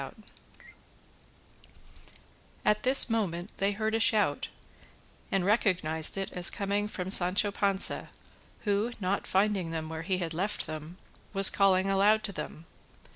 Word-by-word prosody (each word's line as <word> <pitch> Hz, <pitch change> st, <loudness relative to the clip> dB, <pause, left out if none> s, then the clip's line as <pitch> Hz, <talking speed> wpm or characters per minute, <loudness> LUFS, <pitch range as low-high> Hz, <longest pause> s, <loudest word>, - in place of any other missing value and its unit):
At 210 Hz, 0 st, +2 dB
this 260 Hz, +2 st, +5 dB
moment 200 Hz, -6 st, -3 dB
they 200 Hz, +1 st, 0 dB
heard 215 Hz, +1 st, -3 dB
a 225 Hz, -, +1 dB
shout, 210 Hz, -10 st, 0 dB, 0.8 s
and 195 Hz, -2 st, 0 dB
recognised 180 Hz, -7 st, +2 dB
it 195 Hz, -, -4 dB
as 180 Hz, -1 st, +4 dB
coming 200 Hz, +1 st, -2 dB
from 190 Hz, -3 st, -5 dB
Sancho 190 Hz, +3 st, +2 dB
Panza, 200 Hz, -1 st, 0 dB, 0.5 s
who, 210 Hz, +3 st, -1 dB
not 195 Hz, 0 st, -2 dB
finding 195 Hz, -3 st, 0 dB
them 160 Hz, -1 st, -5 dB
where 160 Hz, 0 st, -6 dB
he 185 Hz, +2 st, -2 dB
had 170 Hz, -2 st, -4 dB
left 195 Hz, +6 st, -3 dB
them, 155 Hz, +3 st, -8 dB, 0.4 s
was 195 Hz, -1 st, +8 dB
calling 195 Hz, -1 st, +2 dB
aloud 210 Hz, +3 st, +3 dB
to 200 Hz, -, -5 dB
them. 155 Hz, -1 st, -8 dB
195 Hz, 130 wpm, -28 LUFS, 175-210 Hz, 0.8 s, was